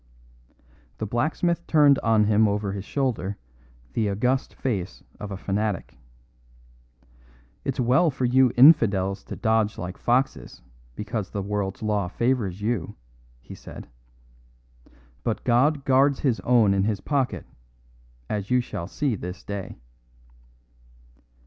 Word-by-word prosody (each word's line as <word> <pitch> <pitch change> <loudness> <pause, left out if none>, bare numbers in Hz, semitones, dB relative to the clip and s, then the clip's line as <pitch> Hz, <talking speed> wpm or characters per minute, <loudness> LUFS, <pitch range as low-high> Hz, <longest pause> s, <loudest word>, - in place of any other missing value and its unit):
The 110 - -3
blacksmith 155 - -1
turned 145 -3 +5
on 110 -2 +3
him 105 +1 +3
over 100 -1 -1
his 100 0 -6
shoulder 115 -9 -2 0.6
the 110 -2 0
august 125 +7 -1
face 100 -8 -3 0.2
of 105 - -6
a 100 - -5
fanatic. 100 0 -2 1.7
"It's - - -3
well 130 +7 +3
for 130 -2 -2
you 130 0 +4
infidels 105 - +5
to - - -7
dodge 110 -1 +1
like 90 +1 -6
foxes 130 - -1 0.3
because 105 -1 -4
the 100 - -4
world's 100 0 -3
law 105 -3 0
favours 105 -3 -1
you," 110 -6 -2 0.5
he - - -11
said; - - -11 1.4
"but 115 - -2
God 135 +4 +2
guards 135 +1 +3
His 130 -6 +1
own 115 -5 +3
in 95 0 +1
His 105 -2 -1
pocket, 140 -4 -1 0.8
as 100 +4 -3
you 125 - +3
shall 85 -8 -5
see 140 +5 -1
this 90 -2 -7
day." 100 -2 -6
110 Hz, 125 wpm, -25 LUFS, 100-130 Hz, 1.7 s, turned